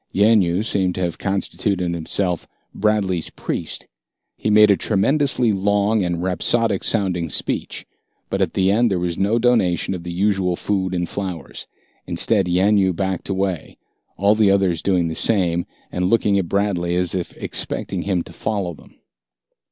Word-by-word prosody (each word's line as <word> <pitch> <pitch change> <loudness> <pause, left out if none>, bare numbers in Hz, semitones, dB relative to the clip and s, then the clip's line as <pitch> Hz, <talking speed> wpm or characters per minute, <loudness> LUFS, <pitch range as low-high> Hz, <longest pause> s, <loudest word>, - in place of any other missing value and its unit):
Yanyoo 100 -2 +3
seemed 95 -5 0
to 95 - -3
have 85 -2 -2
constituted 95 -2 -1
himself 85 +1 -2 0.3
Bradley's 100 -5 0
priest. - - -5 0.5
He - - -2
made 105 0 +6
a - - +5
tremendously 125 +3 +1
long 100 +2 +1
and 85 -1 -2
rhapsodic 100 +3 +1
sounding 90 -6 +1
speech, - - -1 0.4
but 95 - -2
at 90 -4 0
the 95 0 +3
end 115 +3 +3
there 95 - 0
was 85 -1 -2
no 100 +4 +2
donation 115 -8 +2
of 90 - -5
the 85 0 -6
usual 95 -1 +1
food 95 -1 -2
and 85 -1 -1
flowers. 90 -6 -5 0.4
Instead, 100 -5 +2
Yanyoo 95 +1 +3
backed 95 +1 -3
away, 95 -3 -2 0.4
all 100 +2 +4
the 105 -2 +3
others 95 -4 +2
doing 90 -4 +1
the 80 - -3
same, 85 -3 +1 0.2
and 90 +1 -1
looking 105 -3 +2
at 85 -3 -3
Bradley 95 -4 0
as 90 -1 +1
if 90 -2 -4
expecting - - -2
him 95 -4 -1
to - - -13
follow 100 -5 -3
them. - - -18
95 Hz, 160 wpm, -21 LUFS, 90-105 Hz, 0.5 s, made